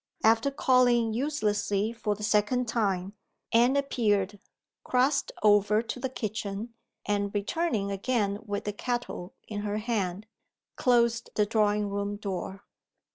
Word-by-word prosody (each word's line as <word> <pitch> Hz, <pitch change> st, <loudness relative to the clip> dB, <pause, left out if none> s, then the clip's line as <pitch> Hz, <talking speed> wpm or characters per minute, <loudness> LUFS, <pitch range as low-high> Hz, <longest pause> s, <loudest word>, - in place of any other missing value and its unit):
After 225 Hz, +4 st, +4 dB
calling 245 Hz, -4 st, +3 dB
uselessly 220 Hz, -5 st, 0 dB
for 215 Hz, -3 st, -2 dB
the 210 Hz, -, -9 dB
second 220 Hz, +4 st, +2 dB
time, 195 Hz, -4 st, -1 dB, 0.4 s
Anne 240 Hz, +4 st, +4 dB
appeared, 205 Hz, -7 st, 0 dB, 0.4 s
crossed 260 Hz, +3 st, +1 dB
over 210 Hz, +1 st, +4 dB
to 245 Hz, -, -5 dB
the 265 Hz, +1 st, -2 dB
kitchen; 215 Hz, -2 st, -4 dB, 0.3 s
and, 205 Hz, -1 st, 0 dB
returning 205 Hz, -1 st, -1 dB
again 205 Hz, -1 st, 0 dB
with 205 Hz, -2 st, -3 dB
the 205 Hz, -, -3 dB
kettle 240 Hz, -5 st, -4 dB
in 210 Hz, -1 st, -4 dB
her 205 Hz, 0 st, -2 dB
hand, 210 Hz, -3 st, -2 dB, 0.5 s
closed 235 Hz, -2 st, +2 dB
the 210 Hz, -, +3 dB
drawing 210 Hz, -1 st, +1 dB
room 200 Hz, 0 st, -2 dB
door. 195 Hz, -1 st, -5 dB
215 Hz, 130 wpm, -28 LUFS, 205-240 Hz, 0.5 s, After